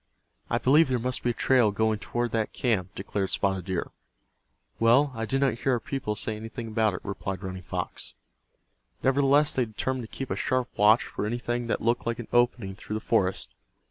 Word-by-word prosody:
"I - - +2
believe 150 +3 +4
there 130 - +2
must 125 +2 -2
be 120 - 0
a - - +1
trail 125 -2 +3
going 110 +1 0
toward 120 +1 -2
that 110 -2 -1
camp," 100 -6 -1
declared 95 0 -2
Spotted 95 -2 0
Deer. 95 -3 -3 0.9
"Well, 125 +5 +5
I 115 -1 -3
did 135 +4 0
not 125 -4 +1
hear 135 - +1
our 120 - +1
people 120 -3 -3
say 110 +1 -2
anything 115 +2 -7
about 110 -3 +1
it," - - -6
replied 95 -1 -4
Running 95 0 -5
Fox. - - -5 0.9
Nevertheless 140 +2 +4
they 125 - +1
determined 125 +3 -3
to - - -11
keep 135 - -4
a - - +1
sharp 130 -1 0
watch 105 +3 +5
for 105 - -4
anything 120 +1 -2
that - - -1
looked 115 +1 0
like 115 0 -1
an 120 - -8
opening 120 -5 +2
through 105 +2 -6
the - - -1
forest. 95 - 0
115 Hz, 200 wpm, -27 LUFS, 105-125 Hz, 0.9 s, Well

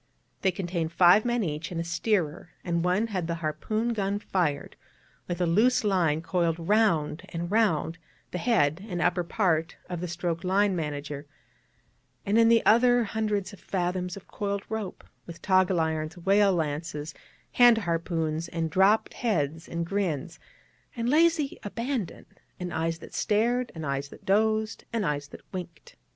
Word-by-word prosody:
They 190 - +3
contained 175 -3 -3
five 180 +5 +6
men 240 -1 +1
each 155 0 -4
and 170 - -3
a - - -1
steerer, 170 -1 -1
and 170 -1 -1
one 180 +5 +2
had 190 -7 -3
the 170 - -1
harpoon 215 +9 -2
gun 200 -2 -1
fired, 170 -8 -1 0.5
with 175 - -2
the 180 - +1
loose 220 +10 +3
line 170 -6 +1
coiled 170 -2 0
round 170 -4 +1
and 170 +2 -4
round 165 -7 +1 0.3
the 180 - -3
head 175 -5 +2
and 175 -2 -3
upper 175 0 +1
part 165 -4 0
of 175 -2 -5
the 180 - -3
stroke 170 0 -3
line 195 +1 +2
manager; 145 -2 -4 1.0
and 210 +3 +3
in 230 0 +6
the 230 0 +4
others 240 0 +4
hundreds 210 -3 -1
of 200 - -12
fathoms 180 0 -2
of 195 - -13
coiled 200 -1 -3
rope, 220 -4 -5 0.2
with 170 -1 -9
toggle 185 -2 +3
irons, 160 0 -1
whale 195 +3 +4
lances, 150 -1 -3 0.4
hand 240 -2 +6
harpoons, 165 -3 -1
and 165 -1 -3
dropped 195 +5 +3
heads, 160 - -1
and 170 0 -2
grins, 175 -4 -2 0.6
and 235 0 -1
lazy 315 -2 +3
abandon, 230 -2 -4 0.3
and 180 -1 -4
eyes 165 0 -1
that - - -13
stared, 235 +4 +1
and 160 -1 -5
eyes 140 0 -2
that - - -14
dozed, 215 +2 +1
and 225 -3 -1
eyes 145 -2 -2
that - - -12
winked. 175 -4 -8
180 Hz, 160 wpm, -27 LUFS, 165-210 Hz, 1.0 s, five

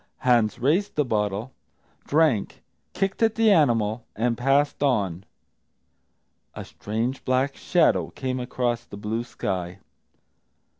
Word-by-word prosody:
Hans 120 -4 +3
raised 155 - +1
the 150 - +1
bottle, 105 +1 -2 0.5
drank, 150 -9 +1 0.3
kicked 195 +3 -2
at 225 -1 +3
the 225 -1 +4
animal, 115 - +2
and 115 +2 0
passed 135 +5 +1
on. 100 - 0 1.3
A - - -7
strange 115 +5 -4
black 130 +2 0
shadow 175 -2 +2
came 130 -1 -4
across 125 -1 -2
the 100 - -11
blue 110 +3 -3
sky. 90 -6 -4
125 Hz, 115 wpm, -24 LUFS, 110-145 Hz, 1.3 s, the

